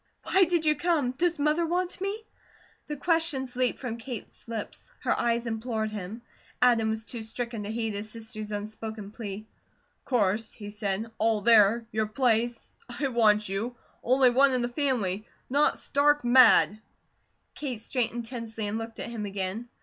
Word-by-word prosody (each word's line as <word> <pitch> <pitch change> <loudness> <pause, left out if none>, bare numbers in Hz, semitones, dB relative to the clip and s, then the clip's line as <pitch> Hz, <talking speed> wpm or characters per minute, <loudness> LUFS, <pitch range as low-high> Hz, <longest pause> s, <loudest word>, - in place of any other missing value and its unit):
"Why 380 0 +4
did 340 -2 0
you 305 0 +4
come? 320 -8 +1
Does 340 +5 0
Mother 300 +3 +2
want 355 +2 -2
me?" 405 +3 -3 0.6
the 295 - -4
questions 300 -5 0
leaped 250 0 +1
from 240 -3 -5
Kate's 235 -2 -8
lips; 230 - -6
her - - +1
eyes 235 0 0
implored 225 -1 -2
him. 210 +3 -6 0.4
Adam 235 -3 +4
was 220 0 -2
too 235 -1 -5
stricken 230 0 -4
to 210 - -4
heed 225 -1 -2
his 205 +2 -5
sister's 220 -1 -6
unspoken 215 0 -6
plea. 215 -2 -7 0.6
"Course," 220 -3 0
he 205 -1 -9
said. 210 +1 -3
"All 220 -1 +2
there 225 +1 +5
your 220 0 0
place 235 0 0
I 270 +3 -2
want 215 -3 +3
you. 210 +6 -3 0.3
Only 255 +1 +4
one 270 +2 +5
in 250 -1 +1
the 240 - -1
family 235 -8 -1 0.2
not 285 +2 +3
stark 290 -1 +2
mad!" 240 -4 +6 0.7
Kate 260 -6 -4
straightened 235 0 -2
tensely 225 -2 -5
and 210 +2 -2
looked 225 0 -7
at - - -3
him 215 -3 -4
again. 200 +4 -3
230 Hz, 165 wpm, -28 LUFS, 215-260 Hz, 0.7 s, mad